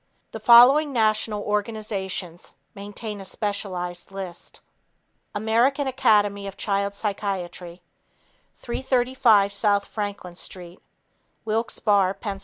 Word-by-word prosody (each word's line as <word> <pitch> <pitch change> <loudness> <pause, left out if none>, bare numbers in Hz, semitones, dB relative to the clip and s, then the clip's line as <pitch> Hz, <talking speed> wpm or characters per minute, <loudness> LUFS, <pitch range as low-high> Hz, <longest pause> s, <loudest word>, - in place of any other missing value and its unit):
The 220 - -7
following 250 +7 +7
national 215 -3 +1
organizations 205 -4 -4 0.2
maintain 205 +1 -7
a - - -7
specialized 190 -3 -4
list: 185 -3 -8 0.8
American 235 +7 +1
Academy 205 -6 +2
of 195 0 -8
Child 200 -1 -1
Psychiatry 185 -4 -4 0.7
335 245 -5 +2
S. 200 0 +1
Franklin 205 -4 -6
St. 175 0 -9 0.6
Wilkes 225 +2 -1
Barre, 200 -3 +2
Pa. 200 -2 -5
205 Hz, 95 wpm, -24 LUFS, 195-220 Hz, 0.8 s, following